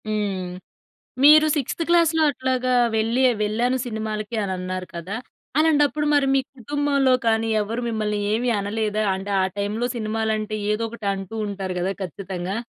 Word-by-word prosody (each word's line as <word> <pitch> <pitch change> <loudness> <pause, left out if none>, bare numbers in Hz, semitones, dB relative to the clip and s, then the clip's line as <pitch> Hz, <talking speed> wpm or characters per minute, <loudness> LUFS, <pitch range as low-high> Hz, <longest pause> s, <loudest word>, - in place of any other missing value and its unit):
హ్మ్. 205 -3 -1 0.8
మీరు 305 +2 +8
సిక్స్థ్ 295 +2 -2
క్లాస్‌లో 335 -2 +4
అట్లాగా 255 -1 -1 0.2
వెళ్ళి 225 +4 +1
ఆహ్, 235 - -1
వెళ్ళాను 235 +5 +1
సినిమాలకి 220 -1 -4
అనన్నారు 185 -1 -4
కదా! 180 +5 -5 0.4
అలాంటప్పుడు 300 -1 +3
మరి 285 -1 +3
మీ 270 - +4 0.2
కుటుంబంలో 280 +1 +1
కానీ 225 0 +2
ఎవరు 220 +3 -2
మిమ్మల్ని 215 -2 -1
ఏవి 240 +3 +1
అనలేదా? 215 +1 -1
అంటే, 195 +2 -5
ఆ - - +3
టైంలో 210 +4 -1
సినిమాలంటే 215 -1 -1 0.2
ఏదో 210 +2 -1
ఒకటి 225 -2 -8
అంటూ 195 +2 -7
ఉంటారు 195 -2 -4
గదా 185 +2 0
ఖచ్చితంగా. 185 +1 -5
220 Hz, 140 wpm, -23 LUFS, 200-255 Hz, 0.8 s, మీరు